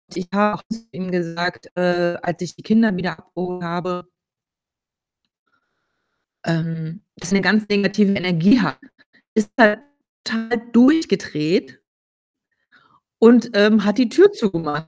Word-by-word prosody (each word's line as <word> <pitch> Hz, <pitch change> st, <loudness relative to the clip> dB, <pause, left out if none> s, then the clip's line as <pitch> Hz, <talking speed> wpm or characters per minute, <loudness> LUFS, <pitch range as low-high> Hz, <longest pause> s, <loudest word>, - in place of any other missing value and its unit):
Ich 180 Hz, 0 st, -6 dB
habe 210 Hz, +1 st, +1 dB
auch -, -, -19 dB
zu 225 Hz, -, -6 dB
ihm 185 Hz, 0 st, -8 dB
gesagt, 175 Hz, 0 st, -4 dB
äh, 175 Hz, -1 st, 0 dB
als 175 Hz, -1 st, -5 dB
ich 175 Hz, -4 st, -8 dB
die -, -, -19 dB
Kinder 220 Hz, -3 st, +2 dB
wieder 185 Hz, -1 st, -5 dB
abgeholt 180 Hz, -1 st, -8 dB
habe 180 Hz, +1 st, -5 dB, 2.4 s
ähm, 165 Hz, +2 st, -4 dB, 0.2 s
dass -, -, -7 dB
er 195 Hz, -, +3 dB
'ne -, -, 0 dB
ganz 215 Hz, +3 st, +2 dB
negative 200 Hz, 0 st, +1 dB
Energie 180 Hz, +5 st, +2 dB
hat. -, -, -2 dB, 0.6 s
Ist 220 Hz, -1 st, -1 dB
er 220 Hz, -2 st, +5 dB, 0.4 s
total 225 Hz, 0 st, -3 dB
durchgedreht 230 Hz, -, +1 dB, 1.4 s
und, 235 Hz, +1 st, +7 dB
ähm, 210 Hz, +1 st, +4 dB
hat 210 Hz, +2 st, 0 dB
die 250 Hz, -3 st, +2 dB
Tür 365 Hz, -, +6 dB
zugemacht. 165 Hz, -, -4 dB
195 Hz, 130 wpm, -19 LUFS, 175-220 Hz, 2.4 s, und